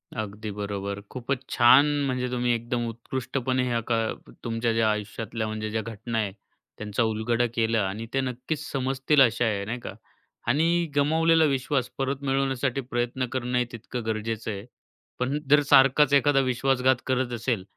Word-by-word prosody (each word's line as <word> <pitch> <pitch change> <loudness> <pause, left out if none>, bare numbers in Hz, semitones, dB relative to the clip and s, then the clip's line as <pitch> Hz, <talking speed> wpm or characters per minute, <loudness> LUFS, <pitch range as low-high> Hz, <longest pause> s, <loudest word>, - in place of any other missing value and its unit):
अगदी 110 0 -5
बरोबर. 100 -1 -4
खूपच 130 +1 -3
छान 120 +4 +6 0.2
म्हणजे 125 -1 -1
तुम्ही 125 -1 +1
एकदम 120 +1 -2
उत्कृष्टपणे 130 +2 -2
ह्या 120 -1 0
का 115 - +3 0.5
तुमच्या 115 0 -1
ज्या 115 -1 +2
आयुष्यातल्या 110 +1 -4
म्हणजे 110 0 -4
ज्या 110 - -1
घटना 115 +1 -5
आहे 105 -3 0 0.5
त्यांचा 105 +2 -1
उलगडा 115 +2 +1
केला 115 -1 +2
आणि 105 +4 -5
ते 135 - +2
नक्कीच 130 +4 -3
समजतील 135 +2 +2
अशा 120 -1 +4
आहे, 100 -2 -1
नाही 120 +4 -4
का? - - -7 0.5
आणि 170 +3 +2
गमावलेला 160 +3 +4
विश्वास 135 -2 0
परत 135 +1 -2
मिळवण्यासाठी 135 -1 0
प्रयत्न 125 0 -2
करणंही 125 -1 0
तितकं 120 +1 -6
गरजेचं 110 0 -2
आहे. 100 0 -6 0.5
पण 130 +4 0
जर 150 0 +6
सारखाच 135 +2 +6
एखादा 140 0 +4
विश्वासघात 130 0 +2
करत 130 -1 0
असेल 115 -3 -1
120 Hz, 150 wpm, -26 LUFS, 110-135 Hz, 0.5 s, छान